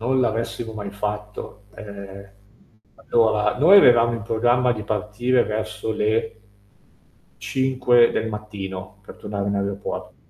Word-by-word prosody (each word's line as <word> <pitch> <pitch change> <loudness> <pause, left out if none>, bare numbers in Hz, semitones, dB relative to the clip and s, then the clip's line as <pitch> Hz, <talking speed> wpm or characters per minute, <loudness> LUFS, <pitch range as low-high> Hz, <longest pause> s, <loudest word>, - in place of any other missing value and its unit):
Non 130 +3 +1
l'avessimo 115 -1 -2
mai 100 -2 -6
fatto, 105 0 -6
ehm, 100 -1 -10 0.7
allora 110 -1 +1
noi 185 +8 +8
avevamo 120 -6 +5
in 115 - -4
programma 120 +2 +2
di 105 -2 -5
partire 110 +4 0
verso 110 0 -4
le 110 +3 -1 1.0
5 125 -2 +2
del 110 0 -2
mattino, 100 -2 -7
per - - -12
tornare 100 -1 -4
in 100 - -1
aeropor 100 0 -4
110 Hz, 120 wpm, -22 LUFS, 105-120 Hz, 1.0 s, noi